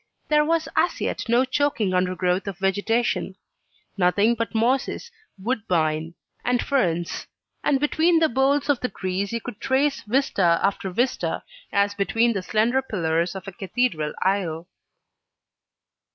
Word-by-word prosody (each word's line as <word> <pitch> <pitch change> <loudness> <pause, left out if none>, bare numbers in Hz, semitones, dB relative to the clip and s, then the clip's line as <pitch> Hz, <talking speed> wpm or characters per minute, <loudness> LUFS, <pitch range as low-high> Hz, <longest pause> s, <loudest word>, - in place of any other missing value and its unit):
There 300 0 +4
was 325 +1 +1
as - - +2
yet - - -3
no 240 +3 +4
choking 260 -8 0
under 180 0 +1
growth 180 +2 0
of 195 -3 -4
vegetation; 205 +5 0 0.6
nothing 200 +4 +3
but 230 0 -3
mosses, 260 - 0 0.3
woodbine, 170 -8 -1 0.3
and 245 0 +1
ferns; 175 - -1 0.4
and 275 - +2
between 320 +4 +3
the 325 -1 +4
boles 270 +3 +1
of 285 -4 +2
the 250 - -2
trees 190 +1 -3
you 230 - -1
could 210 - -8
trace 275 +2 +1
vista 210 -8 +2
after 195 -1 0
vista, 245 +8 -1 0.3
as 200 0 +2
between 225 +4 +1
the 195 - -2
slender 225 +7 +1
pillars 170 -7 -1
of 190 0 -8
a - - -5
cathedral 185 -5 -1
aisle. 175 -4 -1
215 Hz, 140 wpm, -24 LUFS, 185-260 Hz, 0.6 s, There